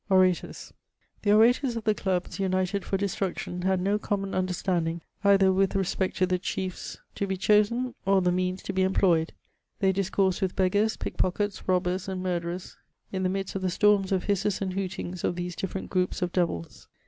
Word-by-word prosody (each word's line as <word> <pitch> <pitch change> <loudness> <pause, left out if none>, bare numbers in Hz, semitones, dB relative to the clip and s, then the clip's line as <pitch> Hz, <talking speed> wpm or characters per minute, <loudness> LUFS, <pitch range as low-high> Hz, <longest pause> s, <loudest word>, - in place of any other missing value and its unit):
osATcmg. 185 -2 +2 0.5
The 205 - +2
orators 235 +4 +4
of 230 - -4
the 215 - +3
clubs, 190 -2 -2
united 185 +1 0
for 195 - -1
destmdtion, 185 -2 -3
had 190 -1 +2
no 200 +3 +1
comjnon 195 -2 -2
undenstanding 175 -2 -1 0.2
eitlier 195 -1 +5
with 195 +1 +1
respect 190 0 -1
to 185 - +3
the 180 0 0
chse& 185 0 -4 0.2
to 200 - -2
be 190 -1 -2
chosen, 215 +6 +2
or 195 0 +4
the 180 -1 +2
means 185 +1 -1
to 195 - -4
be 190 - +1
employed; 185 -3 +2 0.5
they 190 -1 +2
diseoafsed 190 0 +1
widt 190 -2 -1
beggars, 205 +4 +2
pickpockets, 200 +2 -2
robbers, 180 0 0
aiid 190 -1 -3
mufderors, 175 -1 -3 0.3
in 190 - -2
the 185 - +1
midst 195 0 -3
of 195 - -3
the 185 - 0
storms 200 +1 +3
of 190 -2 +1
hisses 200 0 0
and 190 -2 -2
hootangs 185 -2 -4
of - - 0
these 175 0 -4
different 190 +1 -5
gioops 185 0 0
of 175 - -1
devils. 170 - -2
190 Hz, 185 wpm, -27 LUFS, 180-195 Hz, 0.5 s, eitlier